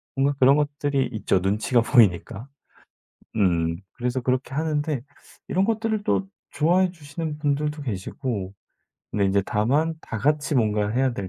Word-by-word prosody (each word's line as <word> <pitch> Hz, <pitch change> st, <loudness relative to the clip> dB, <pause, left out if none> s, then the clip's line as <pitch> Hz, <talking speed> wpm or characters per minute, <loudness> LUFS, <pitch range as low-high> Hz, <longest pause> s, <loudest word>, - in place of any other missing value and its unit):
뭔가 140 Hz, +1 st, +2 dB
그런 135 Hz, +2 st, +6 dB
것들이 145 Hz, -2 st, 0 dB
있죠 105 Hz, -3 st, +1 dB
눈치가 105 Hz, +6 st, +1 dB
보이니까. 115 Hz, -1 st, +2 dB, 0.9 s
음 85 Hz, -5 st, +2 dB, 0.2 s
그래서 125 Hz, +1 st, -2 dB
그렇게 130 Hz, +1 st, -1 dB
하는데 150 Hz, -3 st, -1 dB, 0.5 s
이런 190 Hz, +1 st, +2 dB
것들을 220 Hz, -1 st, 0 dB
또 195 Hz, -, +1 dB, 0.2 s
좋아해 175 Hz, +5 st, +2 dB
주시는 155 Hz, -1 st, -6 dB
분들도 150 Hz, 0 st, -1 dB
계시고 105 Hz, -2 st, -4 dB, 0.6 s
근데 100 Hz, -1 st, +1 dB
이제 100 Hz, +1 st, +2 dB
다만 140 Hz, +10 st, +1 dB
다 115 Hz, -, -6 dB
같이 150 Hz, +5 st, +1 dB
뭔가를 105 Hz, -3 st, +1 dB
해야 130 Hz, -1 st, +2 dB
될 100 Hz, -4 st, -5 dB
135 Hz, 315 characters per minute, -24 LUFS, 105-150 Hz, 0.9 s, 그런